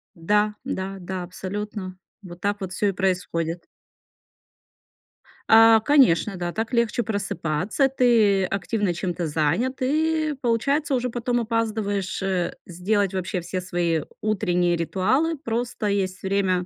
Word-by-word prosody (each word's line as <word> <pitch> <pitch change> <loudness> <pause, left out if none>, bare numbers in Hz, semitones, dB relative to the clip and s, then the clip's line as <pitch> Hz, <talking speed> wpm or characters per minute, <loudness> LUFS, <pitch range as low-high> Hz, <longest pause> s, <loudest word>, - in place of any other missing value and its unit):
Да 210 +5 +1
да 190 +1 -4
да, 190 +2 -5
абсолютно. 190 +1 -6 0.3
Вот 175 -1 -11
так 205 +1 -1
вот 185 -1 -5
всё 205 - 0
и - - +1
происходит. 180 -3 -2 1.8
А, 225 0 +8
конечно, 220 - +4
да. 175 -1 -3
Так 225 +5 -4
легче 235 0 +1
просыпаться. 200 - -1
Ты 225 -7 +3
активно 195 +1 -1
чем-то 175 -1 -3
занят 165 - 0
и 310 +2 +1
получается 275 +5 +1
уже 250 0 -1
потом 240 +1 -1
опаздываешь, 215 -4 -1
э, 185 -2 -1
сделать 195 +3 0
вообще 185 0 -2
все 185 +2 -4
свои 175 -3 0 0.2
утренние 180 -5 +1
ритуалы. 260 - 0
Просто 235 -4 -3
есть 195 -2 -1
время 190 -2 +1
200 Hz, 125 wpm, -24 LUFS, 180-230 Hz, 1.8 s, А